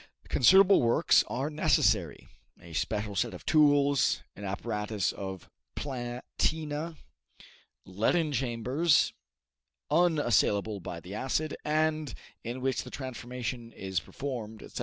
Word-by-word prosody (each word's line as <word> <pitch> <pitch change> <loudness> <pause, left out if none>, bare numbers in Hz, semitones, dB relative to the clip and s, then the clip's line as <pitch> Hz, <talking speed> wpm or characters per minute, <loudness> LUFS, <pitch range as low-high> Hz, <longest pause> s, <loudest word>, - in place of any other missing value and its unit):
Considerable 190 +7 +6
works 120 -1 +4
are 135 +5 -2
necessary 105 - +1 0.3
a 85 -1 -13
special 105 +6 -2
set 90 - -1
of - - -12
tools, 145 -3 +3
an 100 - -10
apparatus 105 -1 -2
of 95 -2 -7 0.3
platina, 145 +5 -3 0.9
leaden 130 - +1
chambers, 130 +5 +1 0.8
unassailable 120 - +2
by 85 -1 -6
the 90 +3 -10
acid, 135 +7 -1
and 155 -3 0 0.3
in 120 +2 -5
which 130 0 0
the - - -9
transformation 125 -2 -6
is 95 -4 -3
performed, 115 -6 -6
etc. - - -8
125 Hz, 110 wpm, -29 LUFS, 105-150 Hz, 0.9 s, Considerable